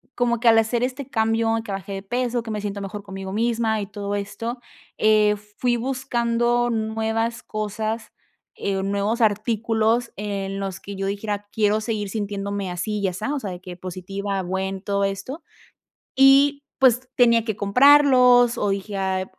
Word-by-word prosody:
como 235 -1 +1
que 235 - 0
al 225 -1 +7
hacer 225 +2 +2
este 260 +1 -3
cambio 225 -1 +1
que 210 - -7
bajé 195 0 -5
de 195 - -4
peso 240 +2 -1
que 225 - -6
me 210 -1 -3
siento 200 -1 -4
mejor 200 +1 -6
conmigo 195 -1 -7
misma 225 0 0
y 200 - -5
todo 205 0 -4
esto, 230 +4 -4 0.4
eh, 215 -1 +4 0.2
fui 245 -1 +1
buscando 240 -1 0
nuevas 225 +1 -1
cosas, 215 +1 -4 0.4
eh, 195 -1 -2
nuevos 200 +4 -1
artículos 225 +2 +1
en 195 -1 -3
los 195 -1 -4
que 200 - -8
yo 195 0 -3
dijera: 205 0 -3
"Quiero 215 -1 +1
seguir 215 -2 -3
sintiéndome 200 -1 -3
así 195 +4 -3
y 200 - 0
asa", 185 +10 -3
o 290 - -1
sea, 205 -7 -5
de 180 - -7
que 180 -1 -8
positiva, 195 +2 -4
buen 190 +1 -3
todo 200 0 -1
esto, 195 - -4 0.7
y 275 +1 +5 0.2
pues, 255 -1 +3
tenía 235 -2 +4
que 220 -3 -2
comprarlos 250 +2 +5
o 205 - 0
dije: 195 +1 -3
"Ay", 190 -1 -1
215 Hz, 165 wpm, -23 LUFS, 200-235 Hz, 0.7 s, al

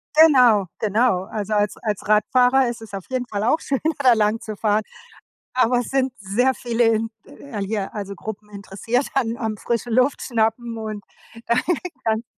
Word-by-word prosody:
Genau, 250 -10 +6
genau. 215 -2 +2
Also, 215 0 -4
als 205 -1 +1
als 210 -3 -4
Radfahrer 250 +4 +4
ist 235 -1 -6
es 215 -3 -12
auf 195 -2 -6
jeden 255 -1 -2
Fall 205 -2 -3
auch 305 +8 +2
schön, 270 -2 -2 0.2
da 255 -3 +6
lang 215 0 +1
zu 215 -1 -7
fahren. 215 0 +1 0.7
Aber 250 -1 +3
es 245 - -2
sind 265 -1 0
sehr 220 +7 +1
viele 240 -1 0
in 225 0 +1
l 170 +9 -7
hier, 200 -1 -3
also, 200 -2 -5
Gruppen 210 0 -8
interessiert 205 +6 -2
an 235 -3 0
am 220 -2 -2
frische 235 +2 -2
Luft 255 +4 +2
schnappen 230 0 -1
und 215 -2 -5 0.4
da 235 - +2 0.5
kann 220 +1 0
225 Hz, 175 wpm, -22 LUFS, 210-245 Hz, 0.7 s, Genau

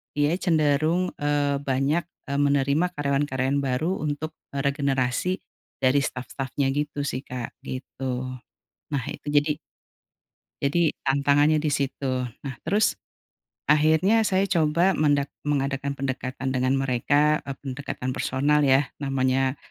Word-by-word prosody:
dia 145 +1 +2
cenderung, 160 +2 +2
eee, 145 -1 +1
banyak, 140 +4 +1 0.3
eee, 140 - 0
menerima 140 +3 +3
karyawan-karyawan 140 -1 0
baru 135 +6 0 0.2
untuk, 150 +2 -3 0.2
eee, 140 - -1
regenerasi 140 +4 +1 0.5
dari 130 +2 +5
staf-stafnya 135 +2 -3
gitu 145 0 -2
sih 130 +2 -3
Kak, 125 -2 -6
gitu. 130 0 -4 0.6
Nah 135 -4 -1
itu - - -8
jadi 145 +1 +2 1.1
jadi 160 +3 +2
tantangannya 140 +3 +3
di 150 -1 0
situ. 135 -2 -1 0.2
Nah 135 - -4
terus 210 +2 +2 0.7
akhirnya 160 +9 +4
saya 190 +1 +2
coba 170 +1 +3
mendak 145 -3 +1 0.2
mengadakan 140 -1 -1
pendekatan 130 0 -3
dengan 130 +1 +1
mereka, 140 +4 +2
mmm, 140 -1 -6
pendekatan 130 -1 -4
personal 145 +4 +1
ya. 135 0 +3
Namanya 135 -1 +1
140 Hz, 120 wpm, -25 LUFS, 135-150 Hz, 1.1 s, dari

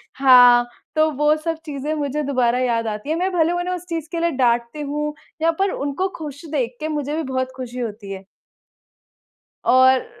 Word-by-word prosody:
हाँ, 245 -2 +7 0.3
तो 310 0 +4
वो 295 +2 +2
सब 330 -1 -1
चीज़ें 295 +1 -3
मुझे 295 0 -2
दोबारा 250 -3 +1
याद 230 -3 0
आती 210 +6 -5
हैं। 320 - +1
मैं 375 +2 0
भले 335 -1 +2
उन्हें 350 +1 -2
उस 360 0 -9
चीज़ 325 -2 -3
के 340 - -2
लिए 340 0 +1
डाँटती 240 +1 0
हूँ, 295 +1 -3 0.3
या 330 +1 +3
पर 390 0 +2
उनको 285 +7 -2
खुश 295 0 -8
देख 255 -5 -1
के 310 - -3
मुझे 295 -1 -2
भी 320 - -2
बहुत 260 -1 -2
खुशी 250 -1 -7
होती 210 -4 -5
है। 195 0 -7 1.4
और 260 - +5
285 Hz, 190 wpm, -21 LUFS, 250-315 Hz, 1.4 s, हाँ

